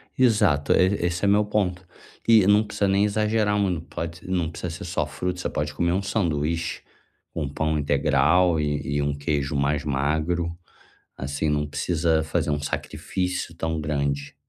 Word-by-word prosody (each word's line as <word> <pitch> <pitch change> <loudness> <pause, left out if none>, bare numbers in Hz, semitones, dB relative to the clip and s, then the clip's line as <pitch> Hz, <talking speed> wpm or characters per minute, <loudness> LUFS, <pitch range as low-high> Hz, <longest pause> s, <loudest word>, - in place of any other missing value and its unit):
Exato, 105 - +3
e 95 -1 +2
esse 90 +3 -1
é - - +3
o 100 - +5
meu 105 +1 +4
ponto 95 -3 -1 0.4
e 110 -4 +6
não 105 +2 +5
precisa 105 -1 -1
nem 100 +1 +3
exagerar 105 0 +1
muito 95 -5 0
pode 85 +2 -6
não 90 -4 0
precisa 85 +1 -5
ser 85 +4 -7
só 90 - -1
fruta. 90 0 -4
Você - - -2
pode 75 0 -3
comer 85 +4 0
um 95 - +1
sanduíche 85 -5 -1 0.5
com 75 -3 -2
pão 80 +2 -1
integral, 80 +4 +3
e 75 -1 -1
e - - +1
um 70 0 0
queijo 70 -1 -1
mais 70 +1 +1
magro. 80 +4 -1 0.6
Assim 70 +3 -2
não 75 0 +1
precisa 80 +2 0
fazer 80 -1 -1
um 75 0 -1
sacrifício 90 +4 -3
tão 80 -1 -2
grande. 70 -2 -2
85 Hz, 170 wpm, -24 LUFS, 75-95 Hz, 0.6 s, e